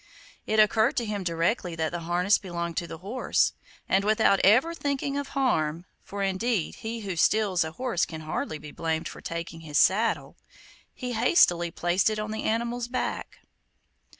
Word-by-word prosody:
It 220 - +2
occurred 220 +3 +4
to 240 - +1
him 210 -2 -3
directly 170 +1 -1
that 160 -1 -1
the 175 - -3
harness 175 +4 +2
belonged 170 -3 -4
to 170 - -1
the 165 - -7
horse, 205 +9 0 0.3
and 190 +1 +2
without 210 -2 +3
ever 250 - +5
thinking 280 -3 -2
of 285 -1 -2
harm 165 - +1 0.2
(for 200 0 -5
indeed 195 0 -1
he 225 +1 -5
who 195 -3 -4
steals 195 +1 +2
a 160 0 -6
horse 250 -7 -1
can 160 -1 -7
hardly 155 0 -3
be 150 0 -10
blamed 160 +1 -2
for - - -9
taking 170 0 -5
his 155 -3 -3
saddle), 220 +4 +2 0.5
he 250 -1 -5
hastily 200 - +4
placed 175 +4 +1
it 215 - -2
on 215 0 -3
the 220 - -3
animal's 235 +2 -1
back. 255 +1 -4
195 Hz, 175 wpm, -27 LUFS, 170-230 Hz, 0.5 s, ever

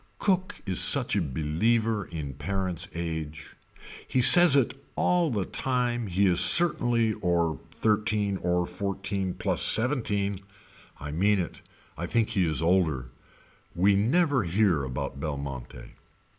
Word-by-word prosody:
Cook 190 0 -1
is 95 -3 -1
such - - +5
a - - 0
believer 105 - -1
in 75 -5 -7
parent's 90 +4 -4
age. 80 -2 -6 0.5
He 130 - -1
says 175 +4 +8
it 135 0 -1
all 175 -2 +1
the 105 -7 -3
time 120 -3 -3
he 95 +2 0
is 90 -2 +4
certainly 120 -9 +4
or 85 -3 -1
thirteen 105 -2 -1
or 90 -1 -1
fourteen 95 +1 -5
plus - - -3
seventeen. 105 -6 0 0.6
I 75 +1 -7
mean 100 +6 +1
it. 90 -4 -6 0.4
I 85 - -4
think 115 +3 -1
he 90 -5 0
is 80 +1 -1
older. 80 -8 0 0.7
We 100 +3 +2
never 135 - +1
hear 90 -4 0
about 65 +1 -6
Belmonte. 70 -4 -7
95 Hz, 130 wpm, -26 LUFS, 85-115 Hz, 0.7 s, says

